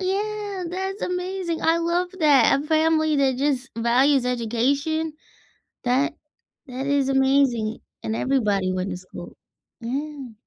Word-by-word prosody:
Yeah, 405 0 -2
that's 380 +3 -4
amazing. 360 -1 -3
I 330 +1 +3
love 340 +2 0
that, 285 -2 +5
a 295 - -5
family 315 -1 +2
that 270 -2 +2
just 265 -1 0
values 250 +3 +3
education. 275 +7 0 0.7
That 270 +5 +2 0.5
that 260 +2 -5
is 280 -1 +1
amazing, 265 -5 +2 0.2
and 220 - -2
everybody 205 -9 +1
went 185 +1 -2
to 180 - -4
school. 185 0 -11 0.4
Yeah. 270 0 -5
280 Hz, 125 wpm, -23 LUFS, 250-325 Hz, 0.7 s, that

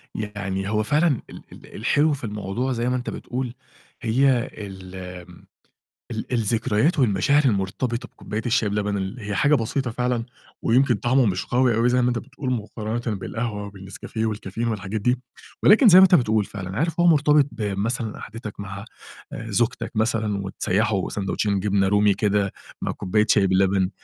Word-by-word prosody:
يعني 100 -2 -3
هو 105 0 +1
فعلًا 150 +4 +2
ال - - -10
ال - - -14
الحلو 145 +8 +2
في 135 - -6
الموضوع 105 +4 -3
زي 120 +1 -1
ما 125 - 0
أنت 125 - -3
بتقول 125 -1 -4 0.5
هي 125 +2 +2
الم 95 -3 -9 0.6
ال 110 +2 -5
الذكريات 115 - +1
والمشاعر 130 +6 +3
المرتبطة 115 +3 -1
بكوباية 105 +1 -6
الشاي 115 -3 +2
بلبن 105 0 -1
اللي 95 +5 -4
هي 100 - -1
حاجة 145 +1 +4
بسيطة 125 +1 -1
فعلًا 125 0 -1 0.4
ويمكن 125 +1 +3
طعمه 125 +4 +2
مش 95 -3 -1
قوي 125 -1 +2
أوي 115 +2 +3
زي 125 0 +3
ما 125 - +2
أنت 120 - -1
بتقول 135 +1 -5
مُقارنة 110 0 -3
بالقهوة 105 -1 -4
والنسكافيه 100 +3 -5
والكافيين 110 +1 -3
والحاجات 105 -1 -3
دي، 125 +3 +1 0.4
ولكن 225 +4 +7
زي 185 0 +9
ما - - +9
أنت 185 -1 +6
بتقول 110 - +2
فعلًا 95 -2 -6
عارف 165 +1 -1
هو 175 - +4
مرتبط 150 -2 +5
بمثلا 110 +2 -2
قعدتك 110 -2 -8
مع 100 +1 -7 0.5
آآ، 115 - -6
زوجتك 120 +4 0
مثلًا 110 -2 0
وتسيّحوا 100 +1 0
ساندوتشين 100 0 -1
جبنة 95 0 +1
رومي 105 0 +4
كده 100 -1 0 0.3
مع - - -1
كوباية 105 +3 0
شاي 100 -2 +4
بلبن 95 0 +2
110 Hz, 160 wpm, -23 LUFS, 100-125 Hz, 0.6 s, زي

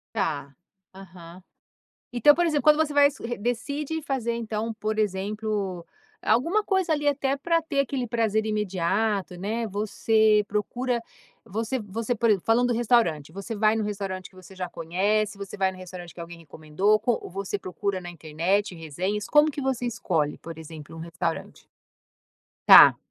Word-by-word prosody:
Tá, 145 -8 -2 0.4
aham, 180 -2 -13 0.7
então, 270 +5 +6
por 345 - +2
exemplo, 305 -3 +1
quando 300 -1 +6
você 310 -2 +1
vai 285 0 +6 0.3
decide 280 +8 -2
fazer 255 -5 -2
Então, 225 -1 -3
por 215 0 -2
exemplo, 200 -2 -2 0.4
alguma 335 - +2
coisa 380 -4 0
ali, 295 -1 -1
até 280 -1 +1
pra 330 +3 0
ter 280 -3 -2
aquele 270 -2 -1
prazer 220 -2 0
imediato, 200 -1 -1
né, 220 +5 -2
você 215 +1 +2
procura 240 +4 -2 0.4
você 225 +6 -3
você, 220 +3 -3
por 230 0 +1
exemplo, 200 -5 +2
falando 240 +2 +3
do 245 - +1
restaurante, 210 - +2
você 195 +6 -6
vai 215 +1 +3
num 220 - -1
restaurante 195 -3 -4
que 185 - -24
você 185 +1 -14
já 180 -1 -4
conhece, 200 +6 0
você 200 0 -8
vai 190 -1 +1
no 185 - -12
restaurante 180 -1 -9
que 170 - -9
alguém 170 0 -9
recomendou 165 +7 0
co 235 +2 -1
você 195 +2 -4
procura 190 0 -3
na 175 -1 -8
internet 175 +5 -1
resenhas, 180 +6 -3
como 300 +1 +5
que 285 -1 -5
você 250 -2 -1
escolhe, 165 -10 -1
por 165 -1 -9
exemplo, 160 -1 -10
um 165 - -9
restaurante? 170 0 -5 1.0
Tá - - +10
210 Hz, 160 wpm, -25 LUFS, 185-240 Hz, 1.0 s, Tá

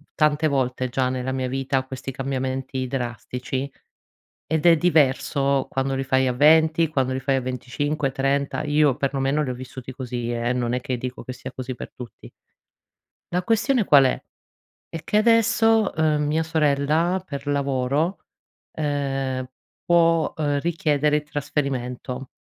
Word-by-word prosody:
tante 150 0 +2
volte 130 -3 -1
già 130 0 0
nella 130 0 -3
mia 130 -1 -2
vita 135 0 -1
questi 130 0 -6
cambiamenti 130 0 -3
drastici. 125 +1 -4 0.8
Ed 160 +1 -1
è 170 - +8
diverso 140 -4 +2
quando 135 0 -1
li 135 - -1
fai 130 -1 +2
a 125 - +1
20 160 +3 +4
quando 130 -4 0
li 130 - -3
fai 135 0 +1
a - - -1
25, 130 +3 -2
30, 135 0 -1
Io 150 -2 +2
perlomeno 140 +2 0
li 130 - -3
ho - - -3
vissuti 130 0 -9
così 120 -2 -4
eh, 120 +1 -1
non 120 -1 -1
è 125 - -1
che 125 0 -3
dico 125 +1 -6
che 130 - -6
sia 130 +1 -8
così 130 0 -5
per - - -9
tutti. 125 -2 -11 1.0
La 180 0 0
questione 230 +3 +2
qual 140 -6 +6
è? 130 - 0 0.7
È 165 - -7
che 210 - +1
adesso, 225 -1 +4
ehm, 155 -1 +1
mia 155 +2 +1
sorella 160 +3 +1
per 140 -5 -7
lavoro, 140 +4 0 0.5
ehm, 135 -3 -2 0.4
può, 165 -2 +3
ehm, 145 -2 0
richiedere 150 -2 +1
il 150 - -3
trasferimento. 135 -3 -4
135 Hz, 150 wpm, -23 LUFS, 130-155 Hz, 1.0 s, è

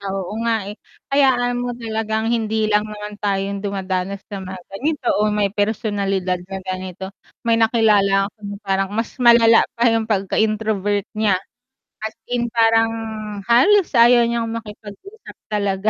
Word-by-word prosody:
Oo 195 -2 -4
nga, 230 -1 +2
eh. 205 - -7 0.4
Hayaan 245 -3 +2
mo 245 -1 -3
talagang 220 -1 -2
hindi 220 -1 0
lang 210 +1 +2
naman 210 0 -8
tayong 200 0 -1
dumadanas 195 -1 -3
sa 200 -2 -7
mga 190 0 -7 0.2
ganito 285 +7 -2 0.2
o 215 - +3
may 210 -2 0
personalidad 200 -4 -1
na 195 - -5
ganito. 185 +1 -6 0.3
May 230 -1 +2
nakilala 210 -4 +3
ko - - -63
na 205 -1 -6
parang 195 0 0
mas 225 - -2
malala 235 -1 +6 0.2
pa 235 - +1
'yung 225 -1 0
pagka-introvert 205 0 0
niya, 215 -3 +1 0.7
as 220 0 -5
in 240 -1 -2
parang 225 -1 +3 0.6
halos 345 - +5
ayaw 240 0 +6
niyang 235 -1 -1
makipag-usap 225 - -10
talaga. 200 -1 -1
215 Hz, 145 wpm, -20 LUFS, 195-230 Hz, 0.7 s, malala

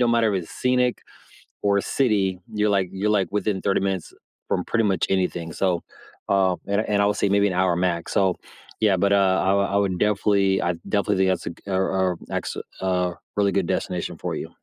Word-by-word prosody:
don’t 120 -1 +3
matter 115 -3 +3
if 90 -3 -1
it's - - -14
scenic 125 -1 +2 0.7
or 100 -1 +2
a - - -1 0.2
city, 110 -7 +3 0.3
you're 105 0 +3
like 95 -2 0
you're, 100 +2 -1
like, 95 - -1
within 100 -1 0
30 100 - +1
minutes 95 -3 -3 0.4
from - - +1
pretty 115 -1 +2
much 90 - 0
anything, 90 -3 -2
so, 95 - +3 0.7
um 95 -2 +2
and 100 +1 +2
and 105 - +2
I 100 - +3
would 105 - +1
say - - +2
maybe 100 0 +4
an 90 - -3
hour 90 -2 +2
max, 85 -1 -4
so 95 -2 +2 0.4
yeah, 105 -3 +4
but, 100 +2 +2
uh, 95 -1 +3
I - - +4
wo 100 - +3
I - - +3
would 95 -3 -1
definitely 100 -1 +2 0.2
I 85 - +2 0.2
definitely 100 0 +2
think 95 0 +3
that's - - -4
a 85 - -9 0.2
a 95 - +2 0.4
a 85 - -14 0.2
ex - - -8 0.4
a 95 - 0 0.5
really 100 -1 +3
good 95 -1 +1
destination - - -2
for - - -2
you. - - -6
100 Hz, 220 wpm, -23 LUFS, 95-105 Hz, 0.7 s, maybe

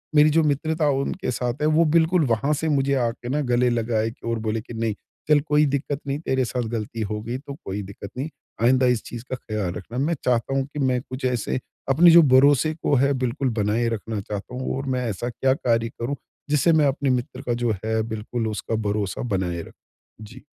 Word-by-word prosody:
मेरी 150 +1 +7
जो 160 +2 +4
मित्रता 155 +2 +1
उनके 140 0 -3
साथ 125 +2 -3
है 150 - +3
वो 165 +1 +5
बिल्कुल 165 0 +4
वहाँ 120 +6 +1
से 160 +2 -1
मुझे 140 -2 +2
आके 120 +1 -3
ना 145 +3 0
गले 125 +1 +3
लगाए 115 -1 0 0.2
और 115 -1 -1
बोले 110 0 -2
कि 115 - -11
नहीं, 115 -1 -1 0.4
"चल 150 -1 +6
कोई 150 0 +4
दिक्कत 140 0 -1
नहीं, 140 +1 -1
तेरे 130 -5 0
साथ 125 +1 -2
गलती 115 0 -4
हो 105 0 -3
गई 120 +3 -4
तो 140 +1 -9
कोई 100 +2 -3
दिक्कत 100 +1 -9
नहीं। 140 +5 -3 0.3
आइन्दा 130 +2 +4
इस 110 - -6
चीज़ 120 -1 -7
का - - -1
ख़्याल 110 -6 -3
रखना।" 115 +7 -7
मैं 150 +6 +1
चाहता 125 +2 +1
हूँ 135 - +1
कि 150 - -4
मैं 130 -2 +1
कुछ 130 +1 -6
ऐसे 125 0 0 0.3
अपने 165 +6 +7
जो 170 +1 +9
भरोसे 145 +3 +5
को 145 - +3
है 140 +2 +3
बिल्कुल 125 +2 -1
बनाए 110 +3 +1
रखना 110 -1 -3
चाहता 105 +4 -6
हूँ। 130 +1 -2
और 135 - -4
मैं 125 -1 -1
ऐसा 110 +4 -3
क्या 130 +2 +1
कार्य 115 -4 0
करूँ 120 +5 -2 0.3
जिससे 150 +3 +3
मैं 155 -2 +4
अपने 135 0 0
मित्र 125 -1 -1
का 120 - -1
जो 115 - +3
है 110 0 +1
बिल्कुल 110 +1 -3
उसका 110 +1 -3
भरोसा 100 -2 -2
बनाए 90 -2 -2
रख - - -13 0.5
जी। 120 +5 -11
125 Hz, 215 wpm, -24 LUFS, 115-140 Hz, 0.5 s, जो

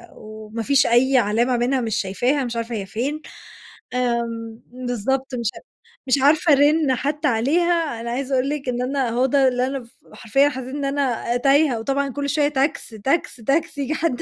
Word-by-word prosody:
وما 215 +1 -8
فيش 280 +1 +3
أي 255 +3 +4
علامة 235 +3 +2
منها، 255 +2 +1
مش 220 -2 -2
شايفاها، 245 +8 0
مش 240 -1 -5
عارفة 230 0 -3
هي 200 -2 -4
فين. 270 +10 -3 0.7
آمم، 235 -2 -2
بالضبط 255 +2 -3
مش 235 -3 -2 0.6
مش 260 - +4
عارفة 305 +2 +4
أرن 290 -1 +3
حتى 295 +4 -1
عليها. 300 +2 +1
أنا 235 0 -4
عايزة 270 +2 -2
أقول 260 +2 +1
لِك 285 -3 -3
إن 245 0 -2
أنا، 260 -1 -1
هو 245 +3 +1
ده 270 0 +3
اللي 250 0 +1
أنا 270 -2 -4
ف 230 - -18 0.2
حرفيًا 270 +5 +2
حسيت 260 0 -6
إن 285 -1 -3
أنا 260 -4 -1
تايهة، 275 -2 +3
وطبعًا 275 +4 -1
كل 280 +1 -3
شوية 290 +1 +2
تاكس، 280 -1 -1
تاكس، 250 +11 -1
تاكسي، 285 +5 -1
ييجي 280 +3 -1
حد 310 -7 -1
260 Hz, 180 wpm, -22 LUFS, 235-280 Hz, 0.7 s, أي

